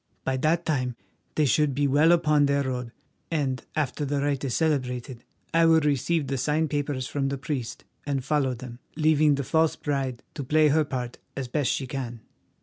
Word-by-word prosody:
By 135 - 0
that 165 +5 +1
time 125 -5 -1 0.4
they 155 - +3
should 145 0 +2
be 145 +1 +1
well 145 +4 +4
upon 150 -4 +4
their 140 0 +2
road, 125 -3 -3 0.4
and, 135 -7 -1
after 150 -1 -1
the 145 0 -1
rite 140 -1 -1
is 130 -4 -1
celebrated, 130 -5 -1 0.3
I 165 0 +5
will 160 0 +6
receive 150 +2 +1
the 135 -1 -2
signed 150 +3 0
papers 145 -3 -1
from 135 +1 -1
the 140 - -2
priest 130 -4 -4 0.2
and 140 -3 -2
follow 140 -3 +1
them, 120 0 -9 0.2
leaving 155 -1 +4
the 140 - -2
false 160 +3 +2
bride 135 -4 -2
to 145 - -5
play 155 +3 +4
her 155 +1 +3
part 125 -3 -5 0.2
as 135 -2 -3
best 140 +2 0
she 135 - -1
can." 125 -3 -5
140 Hz, 190 wpm, -26 LUFS, 130-150 Hz, 0.4 s, will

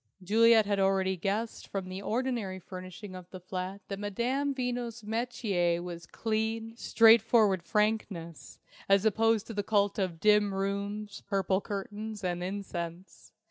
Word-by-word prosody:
Juliet 225 +3 +5
had 200 -1 0
already 190 -1 +2
guessed 205 +5 -3
from 195 -2 -4
the 185 +1 -6
ordinary 230 -4 -2
furnishing 185 +2 -9
of 180 -1 -10
the 185 - -9
flat 185 +2 -5
that 195 -1 -5
Madame 245 +8 -1
Veno's 245 -3 -3
metier 205 -6 0
was 170 -2 -7
clean, 225 0 -2
straightforward 225 -4 +5
frankness, 195 -5 -2 0.3
as 195 +1 +4
opposed 220 0 +3
to 230 - -7
the 205 - -1
cult 205 -1 +1
of 180 -4 -2
dim 210 -1 +4
rooms, 200 +1 -3
purple 195 -1 +1
curtains, 210 +1 -5
and 175 -1 -1
incense. 180 -2 -6
200 Hz, 140 wpm, -30 LUFS, 185-220 Hz, 0.3 s, Juliet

